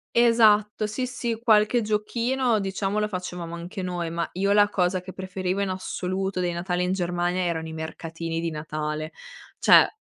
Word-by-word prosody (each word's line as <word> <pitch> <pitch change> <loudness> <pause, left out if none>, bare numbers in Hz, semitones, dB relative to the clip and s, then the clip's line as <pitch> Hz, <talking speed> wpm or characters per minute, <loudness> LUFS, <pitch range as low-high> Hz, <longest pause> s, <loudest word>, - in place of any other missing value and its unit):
Esatto, 215 -3 +4
sì, 255 +5 -2
sì, 240 -3 -3
qualche 220 +1 +4
giochino, 230 +3 0
diciamo, 195 +1 -2
lo 210 - +1
facevamo 180 -3 -5
anche 175 +4 -6
noi, 175 -2 -2
ma 170 0 -2
io 195 +3 +1
la 205 0 +6
cosa 185 -2 +1
che 185 +1 -9
preferivo 185 0 -3
in 200 - 0
assoluto 185 0 -3
dei 175 -1 0
Natali 180 +1 -1
in 180 - 0
Germania 175 0 0
erano 165 -2 -2
i 160 - -7
mercatini 165 +1 -5
di 165 0 -1
Natale, 155 0 -4 0.5
cioè - - +7
185 Hz, 170 wpm, -25 LUFS, 170-210 Hz, 0.5 s, cioè